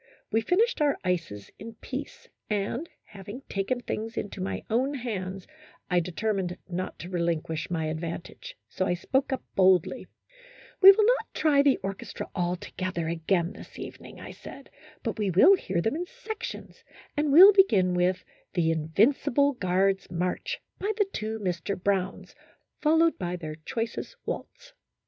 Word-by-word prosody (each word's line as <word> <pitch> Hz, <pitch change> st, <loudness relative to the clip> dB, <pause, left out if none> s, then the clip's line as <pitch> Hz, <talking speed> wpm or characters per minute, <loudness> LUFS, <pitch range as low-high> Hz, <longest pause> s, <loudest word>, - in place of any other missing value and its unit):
We 225 Hz, 0 st, +2 dB
finished 390 Hz, -, +2 dB
our 290 Hz, -2 st, +3 dB
ices 170 Hz, -, -3 dB
in 225 Hz, +2 st, -9 dB
peace, 270 Hz, +5 st, -7 dB, 0.2 s
and, 210 Hz, +10 st, -2 dB
having 205 Hz, +6 st, -10 dB
taken 205 Hz, +6 st, -2 dB
things 225 Hz, -1 st, -4 dB
into 200 Hz, -1 st, -4 dB
my 190 Hz, -, -3 dB
own 260 Hz, +6 st, +1 dB
hands, 195 Hz, -7 st, -4 dB, 0.5 s
I 180 Hz, -, +4 dB
determined 180 Hz, +1 st, -2 dB
not 185 Hz, +1 st, -4 dB
to 175 Hz, -, -7 dB
relinquish 170 Hz, -1 st, -1 dB
my 165 Hz, -3 st, -1 dB
advantage, 170 Hz, -, -6 dB
so 185 Hz, -, -2 dB
I 175 Hz, -, +1 dB
spoke 265 Hz, +10 st, 0 dB
up 265 Hz, -, -2 dB
boldly, 185 Hz, -3 st, +3 dB, 0.4 s
" -, -, -22 dB
We 390 Hz, 0 st, +12 dB
will 420 Hz, +2 st, +3 dB
not -, -, +2 dB
try 290 Hz, -3 st, +4 dB
the 280 Hz, -2 st, +4 dB
orchestra 195 Hz, 0 st, -5 dB
all 175 Hz, 0 st, 0 dB
together 180 Hz, -2 st, -4 dB
again 170 Hz, +2 st, 0 dB
this -, -, -12 dB
evening," -, -, -9 dB
I -, -, -8 dB
said, -, -, -12 dB, 0.2 s
" -, -, -24 dB
but -, -, -3 dB
we 205 Hz, -2 st, +1 dB
will 195 Hz, -, +7 dB
hear 185 Hz, -, -2 dB
them 225 Hz, -, 0 dB
in 350 Hz, +2 st, -3 dB
sections, 440 Hz, -1 st, -7 dB, 0.3 s
and 295 Hz, -1 st, +1 dB
will 375 Hz, +8 st, +10 dB
begin 205 Hz, -, +4 dB
with 180 Hz, +1 st, +1 dB
' -, -, -38 dB
The 165 Hz, -2 st, +2 dB
In 160 Hz, -1 st, -2 dB
vincible 265 Hz, -, +3 dB
Guards' 195 Hz, -2 st, +1 dB
March,' 180 Hz, +1 st, -2 dB, 0.2 s
by 405 Hz, +3 st, 0 dB
the 410 Hz, -, +3 dB
two 220 Hz, +1 st, -3 dB
Mr. 185 Hz, -1 st, -3 dB
Browns, 190 Hz, 0 st, -1 dB, 0.5 s
followed 325 Hz, +2 st, +3 dB
by 180 Hz, -1 st, -2 dB
their 155 Hz, -3 st, -6 dB
choicest 225 Hz, -, -5 dB
waltz." -, -, -6 dB
195 Hz, 165 wpm, -27 LUFS, 180-280 Hz, 0.5 s, We